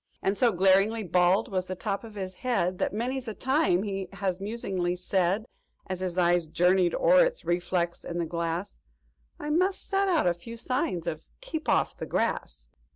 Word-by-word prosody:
"And 195 - +1
so 240 +1 +3
glaringly 195 +4 +3
bald 180 +4 +2
was 185 -1 -1
the 185 - -4
top 200 +2 -3
of 220 -2 -11
his 190 -2 -5
head 185 -5 -1
That - - 0
many's 250 +4 -2
the 220 -3 -5
time 260 - +2
he 195 -2 -4
has 190 -2 -2
musingly 195 -4 -2
said, 185 +3 0 0.4
"As 185 -2 -4
his 185 -1 -3
eyes 175 -2 +3
journeyed 175 +2 +3
o'er - - +5
its - - -2
reflex 175 0 -1
in 170 - -5
the 170 - 0
glass, 170 +3 -3 0.6
'I 300 - -3
must 370 +5 +1
set 390 0 +1
out 345 -5 +2
a 175 - +3
few 230 +7 -10
signs 225 - -1
of 160 -2 -4 0.2
_Keep 325 -11 -5
Off - - +2
the - - -5
Grass! - - -2
190 Hz, 185 wpm, -28 LUFS, 175-235 Hz, 0.6 s, o'er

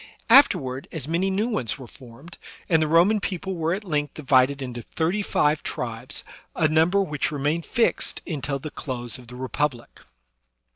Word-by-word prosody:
After 275 +4 +8
ward 130 0 -6
as 135 - -3
many 170 +4 0
new 200 +4 0
ones 130 - -2
were 130 - -10
formed; 130 +7 -14 0.3
and 160 -3 +3
the 155 - +2
Roman 175 +7 +4
people 190 0 -3
were 165 0 0
at 205 - -7
length 150 -6 -2
divided 135 -1 +3
into 125 -3 -5
thirty 170 - -1
five 150 -6 +1
tribes, - - -4 0.3
a 155 - +3
number 165 +6 +3
which 150 -6 -2
remained 150 +3 -1
fixed 235 - +1
until 145 -4 -3
the 150 +2 -7
close 120 -3 -4
of 125 - -14
the 125 - -10
Republic. 130 0 -3
150 Hz, 175 wpm, -24 LUFS, 130-175 Hz, 0.3 s, After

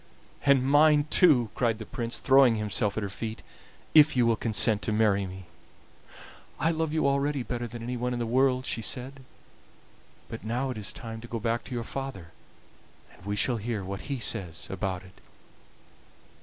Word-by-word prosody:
"And 135 -2 +5
mine 145 +1 +5
too," 130 - +4
cried 115 -3 0
the 110 - -8
Prince, 115 +2 -3
throwing 135 -3 +5
himself 105 -1 -1
at 110 - -1
her - - -2
feet, 110 +3 -6 0.5
"if 150 -3 +6
you 120 - +4
will 115 -1 +3
consent 110 -1 +2
to - - -2
marry 105 -2 +2
me." 95 0 -10 1.1
"I 165 - +2
love 160 -1 -2
you 155 -2 +1
already 140 -1 0
better 120 0 -4
than 115 0 -8
anyone 125 +1 -3
in 125 - -2
the 120 - -2
world," 130 +2 +2
she 115 - -2
said; 130 +4 -3 1.1
"but 115 - -8
now 125 +4 -2
it 125 - -6
is 100 - -3
time 115 -2 -8
to 120 - -10
go 115 -1 -4
back 115 +1 -1
to 130 - -6
your 120 - -2
father, 125 -10 -6 0.8
and - - -19
we 100 - -1
shall 120 +3 +1
hear 110 -2 -3
what 100 +7 -7
he 140 - -1
says 90 -9 -1
about 95 -1 -3
it." 95 0 -18
120 Hz, 185 wpm, -27 LUFS, 105-135 Hz, 1.1 s, if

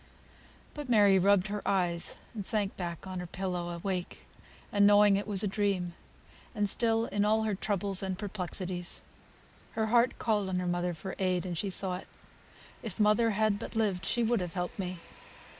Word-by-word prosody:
But 295 -3 -7
Mary 205 -4 +5
rubbed 200 +1 +3
her 205 0 -3
eyes 175 -3 0 0.2
and 210 -3 -5
sank 205 0 0
back 170 -2 -5
on 185 -1 -5
her 180 - -5
pillow, 180 -1 -3
awake, 180 +1 -4 0.5
and 205 0 +5
knowing 205 -1 +6
it 200 +2 -2
was 200 -2 +3
a - - +1
dream; 195 -3 -1 0.6
and 210 -1 +1
still, 225 +2 +2
in 205 -2 0
all 220 +1 +2
her 215 -1 0
troubles 200 -1 +1
and 190 -1 -2
perplexities, 185 -3 -4 0.7
her 220 - 0
heart 240 +1 +4
called 210 -4 0
on 185 - -1
her 180 - -1
mother 175 0 -1
for 185 +4 -6
aid, 185 -1 0
and 180 -2 -3
she 195 +5 -2
thought, 185 -1 -4 0.8
"If 225 -3 -7
mother 215 +2 +4
had 215 -2 +2
but - - -7
lived, 200 -5 0
she 240 +4 +1
would 230 0 +2
have 180 -1 -5
helped 180 +2 -3
me." 180 -2 -4
195 Hz, 180 wpm, -30 LUFS, 180-210 Hz, 0.8 s, knowing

